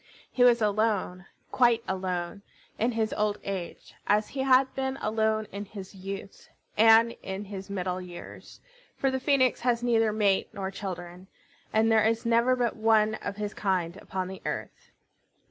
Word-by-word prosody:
He 245 Hz, -, +2 dB
was 240 Hz, -2 st, +5 dB
alone, 205 Hz, -3 st, 0 dB, 0.2 s
quite 235 Hz, -2 st, +3 dB
alone, 185 Hz, 0 st, -3 dB, 0.4 s
in 235 Hz, +3 st, +1 dB
his 220 Hz, -1 st, -1 dB
old 210 Hz, -1 st, 0 dB
age, 190 Hz, -3 st, -6 dB
as 210 Hz, +1 st, +2 dB
he 275 Hz, -, -7 dB
had 265 Hz, 0 st, +4 dB
been 265 Hz, 0 st, -2 dB
alone 220 Hz, -1 st, 0 dB
in 200 Hz, +1 st, -6 dB
his 195 Hz, -1 st, -10 dB
youth, 195 Hz, +1 st, -8 dB, 0.3 s
and 225 Hz, +1 st, +6 dB
in 190 Hz, +2 st, -5 dB
his 195 Hz, -1 st, -8 dB
middle 185 Hz, -2 st, -3 dB
years; 175 Hz, -1 st, -11 dB, 0.4 s
for 270 Hz, -, +1 dB
the 265 Hz, -, -1 dB
Phoenix 260 Hz, -2 st, +2 dB
has 240 Hz, -1 st, 0 dB
neither 225 Hz, -2 st, +3 dB
mate 205 Hz, -2 st, +1 dB
nor 195 Hz, -1 st, -4 dB
children, 180 Hz, -2 st, -7 dB, 0.4 s
and 225 Hz, +1 st, +3 dB
there 220 Hz, -1 st, +5 dB
is 225 Hz, +1 st, +1 dB
never 235 Hz, +2 st, +3 dB
but 240 Hz, -2 st, 0 dB
one 220 Hz, -1 st, +3 dB
of -, -, -4 dB
his 210 Hz, 0 st, -4 dB
kind 185 Hz, -4 st, -1 dB
upon 190 Hz, -2 st, -4 dB
the 190 Hz, 0 st, -8 dB
earth. -, -, -6 dB
215 Hz, 160 wpm, -28 LUFS, 190-230 Hz, 0.4 s, and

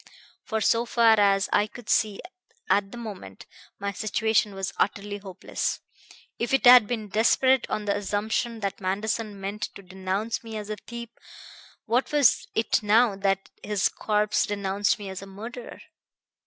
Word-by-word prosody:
For, 220 Hz, -2 st, -3 dB
so 230 Hz, +3 st, +2 dB
far 230 Hz, -2 st, +4 dB
as 195 Hz, -1 st, +3 dB
I 205 Hz, -, +3 dB
could 230 Hz, 0 st, -13 dB
see 210 Hz, -2 st, +1 dB, 0.5 s
at 200 Hz, -1 st, +2 dB
the 240 Hz, -, -8 dB
moment, 200 Hz, -, -9 dB, 0.3 s
my 200 Hz, 0 st, -3 dB
situation 215 Hz, 0 st, 0 dB
was 195 Hz, 0 st, -4 dB
utterly 205 Hz, +1 st, -1 dB
hopeless. 195 Hz, -2 st, -4 dB, 0.6 s
If 235 Hz, +3 st, +1 dB
it 270 Hz, -, 0 dB
had 245 Hz, -3 st, +9 dB
been 220 Hz, -3 st, -4 dB
desperate 255 Hz, +5 st, +3 dB
on 215 Hz, -, -2 dB
the 200 Hz, -1 st, +1 dB
assumption 215 Hz, +3 st, -2 dB
that 195 Hz, 0 st, -3 dB
Manderson 205 Hz, +2 st, -2 dB
meant 200 Hz, +2 st, -5 dB
to 200 Hz, -, -11 dB
denounce 190 Hz, +5 st, -3 dB
me 225 Hz, -1 st, -6 dB
as 210 Hz, 0 st, -6 dB
a 210 Hz, -, -4 dB
thief, 235 Hz, +2 st, -8 dB, 0.8 s
what 245 Hz, +3 st, 0 dB
was 290 Hz, -4 st, +3 dB
it 225 Hz, -, +1 dB
now 215 Hz, +1 st, +4 dB
that 195 Hz, 0 st, -1 dB
his 205 Hz, -2 st, +1 dB
corpse 210 Hz, -1 st, 0 dB
denounced 200 Hz, 0 st, 0 dB
me 205 Hz, -2 st, -8 dB
as 190 Hz, -1 st, -6 dB
a 195 Hz, -, -10 dB
murderer? 225 Hz, +5 st, -9 dB
210 Hz, 160 wpm, -26 LUFS, 200-230 Hz, 0.8 s, had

